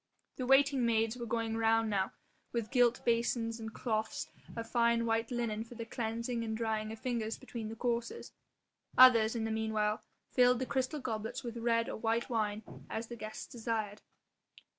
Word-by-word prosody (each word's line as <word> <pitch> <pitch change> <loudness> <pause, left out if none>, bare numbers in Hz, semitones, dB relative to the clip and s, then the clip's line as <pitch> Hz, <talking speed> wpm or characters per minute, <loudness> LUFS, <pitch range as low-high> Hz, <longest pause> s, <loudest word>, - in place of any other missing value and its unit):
The 255 - -3
waiting 270 0 +5
maids 225 -1 +2
were 240 -1 -5
going 225 0 -1
the 225 - -2
round 225 -1 +3
now 195 -1 0 0.4
with 230 -3 -2
gilt 245 -2 +3
basins 230 -1 +1
and 220 0 -6
cloths 220 -2 -2 0.2
of 230 0 -4
fine 235 0 +2
white 225 0 +1
linen 230 -3 -1
for 235 +1 -12
the 230 0 -5
cleansing 230 +1 -2
and 220 -1 -2
drying 220 -1 -1
of 220 - -6
fingers 225 -2 -2
between 225 -3 -6
the 225 - -6
courses; 235 0 -2 0.7
others, 235 -3 +8
in 225 - -1
the 225 - -1
meanwhile, 220 -1 0 0.3
filled 250 0 +5
the 260 - -2
crystal 260 +3 -1
goblets 230 +1 -3
with 235 -1 -5
red 230 0 +1
or - - -4
white 230 +3 0
wine 215 -2 0 0.3
as 225 +1 -4
the 240 - -5
guests 215 -1 -6
desired. 220 -3 -3
230 Hz, 180 wpm, -33 LUFS, 220-240 Hz, 0.7 s, others